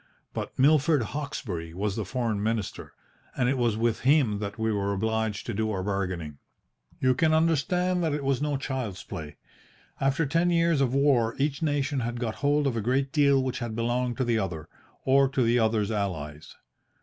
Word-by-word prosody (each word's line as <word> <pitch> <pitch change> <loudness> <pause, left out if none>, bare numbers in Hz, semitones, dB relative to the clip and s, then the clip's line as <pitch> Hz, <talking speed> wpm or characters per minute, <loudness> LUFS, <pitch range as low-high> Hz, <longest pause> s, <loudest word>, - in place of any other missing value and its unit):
But - - -5
Milord 145 0 +4
Hawkesbury 105 - -5
was 100 +1 -1
the 110 - -3
Foreign 115 -2 -2
Minister, 110 -1 -3 0.4
and 125 - +2
it 135 - +2
was 120 -4 +1
with 115 0 +1
him 130 -7 +3
that 100 0 -5
we 110 0 0
were 100 -1 0
obliged 110 +1 -1
to 120 - -3
do 110 +2 -1
our 95 -3 -2
bargaining. 90 -7 -3 0.6
"You 130 -1 +3
can 155 +4 +2
understand 175 +3 +1
that 160 - +1
it 150 - -4
was 135 -1 0
no 145 -1 0
child's 130 -8 -4
play. 75 -1 -8 0.6
After 135 +4 +1
ten 165 +5 +2
years 170 -3 +2
of 130 -1 +1
war 130 -5 +3
each 145 +2 -1
nation 145 -2 0
had 120 0 -3
got 115 -3 -3
hold 145 +1 +2
of 135 -4 0
a 115 - -1
great 130 +4 0
deal 140 -3 +4
which 130 -1 -3
had 120 -3 -4
belonged 120 +1 -1
to - - +1
the 120 -2 +1
other, 85 -6 -4 0.4
or 135 0 +4
to 135 -1 +1
the 120 +1 +3
other's 110 -2 +1
allies. 80 -8 -4
120 Hz, 190 wpm, -27 LUFS, 105-140 Hz, 0.6 s, Milord